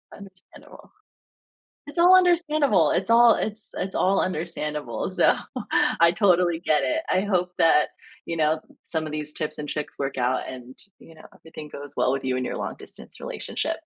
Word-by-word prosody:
Understandable. 190 -2 -15 1.0
It's 290 +3 -8
all 360 +2 +7
understandable, 305 - +3
it's 195 - -1
all 235 0 +7
it's 215 0 -4
it's 190 +1 -4
all 195 +1 +2
understandable, 150 -6 -3
so, - - +3 0.6
I 170 0 +7
totally 175 -3 +2
get 155 -3 +1
it. 320 +1 0
I 185 - +2
hope 180 -3 0
that, 160 -2 +4 0.3
you 165 - -4
know, 155 0 +2 0.2
some 160 -2 -3
of 155 - -6
these 150 0 -4
tips 155 0 -4
and 145 -1 -5
tricks 150 -1 -5
work 135 -1 -4
out 125 +1 0
and, 130 0 -10 0.2
you 165 - -16
know, 155 - -16
everything 155 -2 -11
goes 145 -1 -9
well 130 - +2
with 135 -1 -3
you 130 -1 0
and 130 - -2
your - - -4
long-distance - - -7
relationship. - - -4
165 Hz, 175 wpm, -24 LUFS, 150-205 Hz, 1.0 s, all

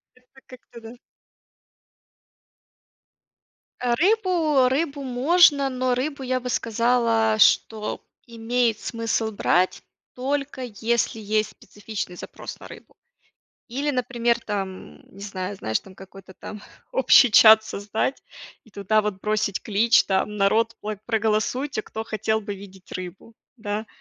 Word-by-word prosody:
Это 255 +1 -23
как-то 245 -2 -14
даж 230 +2 -11 2.8
Э, 245 -1 0
рыбу 345 - +2
рыбу 285 +1 -1
можно, 280 +2 +4
но 255 -1 0
рыбу, 280 +2 -3
я 255 0 -1
бы 250 0 -6
сказала, 230 -1 +1
что 215 0 +2 0.3
имеет 230 0 -1
смысл 230 -1 -2
брать, 185 -3 +1 0.3
только 275 +1 -3
если 235 0 -1
есть 215 0 -1
специфичный 205 -3 -7
запрос - - -9
на - - -11
рыбу. - - -14 0.7
Или, 275 +5 -2
например, 240 -2 0
там, 190 - -6
не 195 - -15
знаю, 200 -1 -5
знаешь, 110 -11 -2
там, 190 -1 -16
какой-то 190 0 -14
там 210 +3 -9 0.3
общий 275 - +6
чат 220 +1 +8
создать 215 +5 -3 0.4
и 225 - -21
туда 200 +2 +1
вот 205 -2 -4
бросить 215 -2 -1
клич, 220 +2 +3
там: 195 +2 -1
"Народ, 220 +3 +2
пло 210 -1 -5
проголосуйте, 225 +4 0
кто 220 +1 -7
хотел 220 0 -1
бы 205 -1 -6
видеть 190 -1 -14
рыбу". 185 +5 -8 0.2
Да? 215 -1 -4
225 Hz, 125 wpm, -23 LUFS, 205-250 Hz, 2.8 s, чат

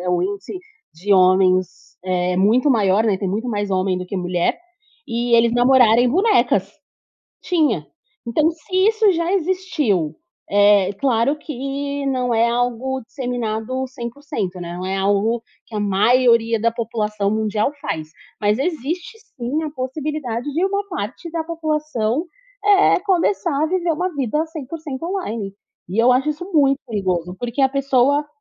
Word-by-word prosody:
é 180 - -4
o 180 0 +1
índice 200 - -4 0.4
de 195 +5 0
homens, 185 -1 +3
eh 180 -1 0
muito 230 +9 +3
maior, 210 -3 +3
né, 200 -4 +1
tem 195 - -2
muito 220 +6 -2
mais 205 -2 -2
homem 185 -1 0
do 180 - -6
que 195 - -5
mulher, 180 -1 0 0.5
e 235 0 0
eles 230 0 +4
namorarem 245 -1 +5
bonecas 390 - +2 0.7
Tinha. 295 - +1 0.4
Então 305 +7 +2
se 330 +3 -6
isso 435 -3 +3
já 335 +1 -1
existiu, 325 - 0 0.3
é 205 -1 +4
claro 260 +3 +1
que 280 0 -4
não 255 -2 0
é 230 +1 +3
algo 245 +2 -1
disseminado 245 0 -3
100%, 240 - -5
né, 175 0 -6
não 185 +1 -5
é 190 +1 -1
algo 205 +4 +1 0.2
que 225 - -13
a 210 - -1
maioria 230 +2 +3
da 230 - +2
população 215 -3 -2
mundial 215 +4 0
faz, 155 -1 -4 0.3
mas 210 +2 +2
existe 345 - -3 0.2
sim 260 +6 -2
a 305 - -4
possibilidade 270 -1 -4
de 335 +5 +1
uma 400 +1 -1
parte 265 - -5
da 330 -1 -2
população, 305 -5 -1 0.4
eh, 405 -1 +5
começar 355 -4 +1
a - - +3
viver 350 -1 0
uma 360 +3 -2
vida 280 +4 0
100% 310 -1 -7
online. 225 - -4 0.3
E 210 +6 +1
eu 250 - +5
acho 270 +4 +1
isso 305 +4 -5
muito 275 -3 +4
perigoso, 185 -5 -2
porque 245 +3 -3
a 265 - +5
pessoa, 275 +1 +2
245 Hz, 150 wpm, -20 LUFS, 205-300 Hz, 0.7 s, namorarem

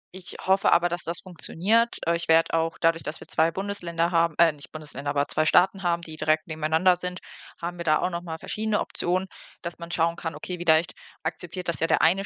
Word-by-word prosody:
ich 185 -1 -9
hoffe 190 +1 +3
aber, 175 +1 +4
dass 175 +1 -3
das 170 +2 -4
funktioniert. 195 +6 0
Äh, 170 - +2
ich 170 0 -4
werde 165 0 +4
auch 165 0 0
dadurch, 165 0 +2
dass 150 - -5
wir - - -12
2 160 0 +2
Bundesländer 175 -3 -2
haben 170 -2 +2
äh, 170 -1 +6
nicht 145 -1 -14
Bundesländer, 145 -2 -6
aber 145 0 +1
2 155 - 0
Staaten 190 +4 +4
haben, 170 -2 0
die 160 -1 -9
direkt 155 0 +1
nebeneinander 160 +3 +2
sind, 180 0 -5 0.4
haben 175 +1 -4
wir - - -3
da 155 -1 +4
auch - - 0
noch 170 0 -3
mal 165 -2 -6
verschiedene 215 +4 -1
Optionen, 185 +2 -1 0.4
dass 170 0 -6
man 170 0 -8
schauen 165 0 +1
kann: 165 -3 -4
„Okay, 180 +4 -6
vielleicht 165 -1 +3 0.3
akzeptiert 175 +2 -5
das 170 - -1
ja 165 - +1
der - - +3
eine 185 +5 +4
170 Hz, 225 wpm, -26 LUFS, 160-180 Hz, 0.4 s, äh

